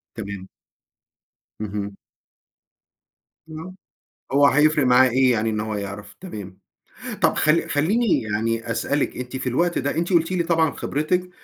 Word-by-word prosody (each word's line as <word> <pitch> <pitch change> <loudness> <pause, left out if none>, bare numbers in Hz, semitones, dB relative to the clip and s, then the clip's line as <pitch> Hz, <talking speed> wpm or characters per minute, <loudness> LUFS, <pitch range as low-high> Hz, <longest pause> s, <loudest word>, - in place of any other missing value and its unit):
تمام. 100 -3 -6 1.1
اهم. 100 -1 -4 1.5
آه، 160 +4 -8 0.6
هو 140 +1 +5
هيفرِق 150 +1 +4
معاه 125 +1 +6
إيه 130 +1 +3
يعني 115 -1 +1
إن 110 -1 -2
هو 110 0 -3
يعرف، 100 0 -6
تمام، 100 - -8 0.6
طَب - - +4
خ 155 - +1 0.2
خلّيني 200 +10 +2
يعني 115 +2 -2
أسألِك 140 +5 -1
أنتِ 125 0 -6
في 130 - -2
الوقت 170 +8 +1
ده، 140 +3 -2
أنتِ 170 +3 -1
قُلتِ 165 +1 +3
لي 175 -2 +1
طبعًا 165 -2 +2
خبرتِك 180 +5 -1
130 Hz, 135 wpm, -23 LUFS, 110-160 Hz, 1.5 s, معاه